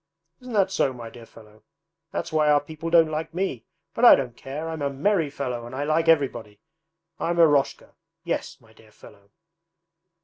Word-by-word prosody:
Isn't 250 Hz, -2 st, -10 dB
that 195 Hz, -3 st, +2 dB
so, 140 Hz, -8 st, 0 dB
my 115 Hz, -2 st, -9 dB
dear 115 Hz, 0 st, -13 dB
fellow? 105 Hz, -1 st, -18 dB, 0.5 s
That's -, -, -5 dB
why 155 Hz, -1 st, +3 dB
our 145 Hz, -1 st, +5 dB
people 160 Hz, +3 st, -7 dB
don't 165 Hz, -2 st, +4 dB
like 155 Hz, +2 st, -4 dB
me; 180 Hz, -, -3 dB, 0.3 s
but 230 Hz, -, -4 dB
I 245 Hz, -, +10 dB
don't 125 Hz, -3 st, -4 dB
care! 145 Hz, +6 st, -7 dB
I'm 160 Hz, -2 st, -5 dB
a 140 Hz, -, 0 dB
merry 160 Hz, +3 st, 0 dB
fellow, 125 Hz, -4 st, -4 dB
and 125 Hz, -, -9 dB
I 140 Hz, -, -2 dB
like 155 Hz, +2 st, 0 dB
everybody. 120 Hz, -10 st, +1 dB, 0.6 s
I'm 170 Hz, +1 st, -1 dB
Eroshka; 145 Hz, -5 st, +2 dB, 0.3 s
yes, -, -, -4 dB
my 110 Hz, -1 st, -22 dB
dear 110 Hz, -1 st, -21 dB
fellow.' 100 Hz, -1 st, -18 dB
145 Hz, 180 wpm, -24 LUFS, 120-165 Hz, 0.6 s, I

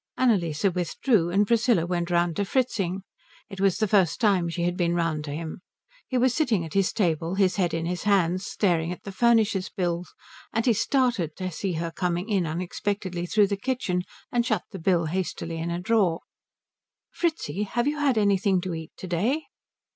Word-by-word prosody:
Annalise 175 Hz, -12 st, +1 dB
withdrew, 180 Hz, -, +1 dB
and 200 Hz, +4 st, +3 dB
Priscilla 220 Hz, -5 st, +3 dB
went 175 Hz, 0 st, -2 dB
round 175 Hz, -1 st, +1 dB
to 205 Hz, -, +1 dB
Fritzing. 195 Hz, -5 st, -1 dB, 0.5 s
It 195 Hz, -1 st, -6 dB
was 195 Hz, -2 st, +3 dB
the 215 Hz, -1 st, +1 dB
first 190 Hz, -4 st, +3 dB
time 195 Hz, -7 st, +2 dB
she 170 Hz, +1 st, -3 dB
had 175 Hz, 0 st, 0 dB
been 175 Hz, -1 st, +1 dB
round 165 Hz, -3 st, 0 dB
to 145 Hz, -, -5 dB
him. 160 Hz, +3 st, -5 dB, 0.5 s
He 255 Hz, -, -1 dB
was 250 Hz, 0 st, +3 dB
sitting 235 Hz, -, +1 dB
at 160 Hz, -, -9 dB
his 195 Hz, -2 st, +2 dB
table, 170 Hz, -2 st, 0 dB
his 190 Hz, -2 st, +2 dB
head 180 Hz, -3 st, +1 dB
in 165 Hz, 0 st, -2 dB
his 175 Hz, +1 st, -2 dB
hands, 185 Hz, -3 st, +2 dB
staring 170 Hz, -5 st, 0 dB
at 180 Hz, -, -7 dB
the 200 Hz, -, -6 dB
furnisher's 220 Hz, -3 st, +2 dB
bill, 175 Hz, -1 st, -2 dB, 0.5 s
and 225 Hz, -, 0 dB
he 240 Hz, -, +5 dB
started 230 Hz, -, +1 dB
to 185 Hz, -1 st, -4 dB
see 185 Hz, +2 st, -3 dB
her 165 Hz, +1 st, -3 dB
coming 180 Hz, +3 st, -2 dB
in 190 Hz, -5 st, +1 dB
unexpectedly 180 Hz, +2 st, -3 dB
through 210 Hz, +3 st, +4 dB
the 200 Hz, 0 st, -2 dB
kitchen, 205 Hz, -6 st, -1 dB, 0.3 s
and 240 Hz, -3 st, +2 dB
shut 220 Hz, -6 st, 0 dB
the 190 Hz, -, -7 dB
bill 170 Hz, -1 st, +2 dB
hastily 165 Hz, -1 st, -3 dB
in 165 Hz, +1 st, -3 dB
a 170 Hz, 0 st, -2 dB
drawer. 190 Hz, -4 st, +2 dB, 0.9 s
"Fritzi, 310 Hz, -, -2 dB
have 240 Hz, +5 st, -1 dB
you 295 Hz, 0 st, -1 dB
had 275 Hz, -5 st, +2 dB
anything 200 Hz, -2 st, +3 dB
to 185 Hz, -1 st, -4 dB
eat 160 Hz, -1 st, -7 dB
to 185 Hz, -, -7 dB
day?" 220 Hz, -, 0 dB
185 Hz, 190 wpm, -26 LUFS, 170-215 Hz, 0.9 s, he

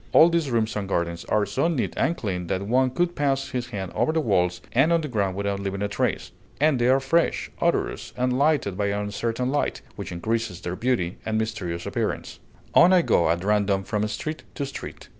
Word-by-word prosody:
All 165 Hz, -, +8 dB
these 165 Hz, -4 st, 0 dB
rooms 115 Hz, -2 st, 0 dB
and 100 Hz, -2 st, -3 dB
gardens 85 Hz, -2 st, -1 dB
are 105 Hz, -1 st, +2 dB
so 100 Hz, -, 0 dB
neat 160 Hz, -7 st, -1 dB
and 170 Hz, -, +1 dB
clean 90 Hz, -6 st, -3 dB
that 95 Hz, +2 st, -1 dB
one 130 Hz, +5 st, +2 dB
could 175 Hz, +7 st, 0 dB
pass 135 Hz, -2 st, 0 dB
his 125 Hz, -1 st, -3 dB
hand 95 Hz, -6 st, -5 dB
over -, -, +1 dB
the 160 Hz, -, +1 dB
walls 90 Hz, -, +1 dB
and 135 Hz, +7 st, +4 dB
on 170 Hz, -1 st, +3 dB
the 150 Hz, -, -3 dB
ground 100 Hz, -7 st, -1 dB
without 100 Hz, 0 st, -2 dB
leaving 100 Hz, 0 st, -3 dB
a -, -, +1 dB
trace; 100 Hz, -, -1 dB, 0.3 s
and 150 Hz, -3 st, +3 dB
they 120 Hz, -, +3 dB
are 130 Hz, +1 st, +5 dB
fresh, 165 Hz, +6 st, +1 dB
odorous, -, -, 0 dB
and 125 Hz, 0 st, +1 dB
lighted 140 Hz, -8 st, +2 dB
by 100 Hz, +1 st, 0 dB
an 100 Hz, 0 st, 0 dB
uncertain 115 Hz, +5 st, -2 dB
light, 145 Hz, -, -1 dB
which -, -, -6 dB
increases 110 Hz, +1 st, -2 dB
their 90 Hz, +1 st, -4 dB
beauty 115 Hz, -7 st, 0 dB
and 110 Hz, 0 st, -1 dB
mysterious 95 Hz, -6 st, -3 dB
appearance. -, -, -3 dB, 0.3 s
On 175 Hz, +2 st, +7 dB
I 180 Hz, -2 st, +5 dB
go 85 Hz, -, +3 dB
at 85 Hz, +2 st, 0 dB
random 100 Hz, -1 st, +2 dB
from 105 Hz, +1 st, -1 dB
street 155 Hz, +9 st, -4 dB
to 140 Hz, -, -2 dB
street. 140 Hz, -, -8 dB
110 Hz, 215 wpm, -25 LUFS, 100-135 Hz, 0.3 s, All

